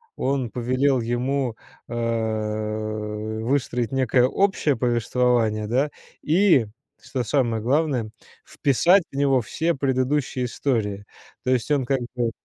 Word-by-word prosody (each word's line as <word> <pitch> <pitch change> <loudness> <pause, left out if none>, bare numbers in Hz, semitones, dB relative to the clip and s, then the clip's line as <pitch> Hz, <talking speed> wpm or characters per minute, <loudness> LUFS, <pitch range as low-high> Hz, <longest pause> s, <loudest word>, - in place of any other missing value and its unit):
он 135 -2 -1
повелел 130 +3 +1
ему, 125 +1 -1 0.3
э, - - -7 1.5
выстроить 125 -2 0
некое 130 -2 +2
общее 175 -1 +1
повествование, 120 -2 +1
да, 135 +6 +1 0.3
и, 165 - +4 0.3
что 130 - -4
самое 115 -1 0
главное, 130 -2 +1 0.3
вписать 170 +7 +3
в - - -12
него 135 -2 +3
все 165 +9 -1
предыдущие 130 -1 0
истории. 110 -6 -2 0.4
То 130 - 0
есть 125 +1 0
он 145 -3 +2
как 135 +1 +1 0.2
бы 120 -2 0
130 Hz, 115 wpm, -23 LUFS, 120-140 Hz, 1.5 s, и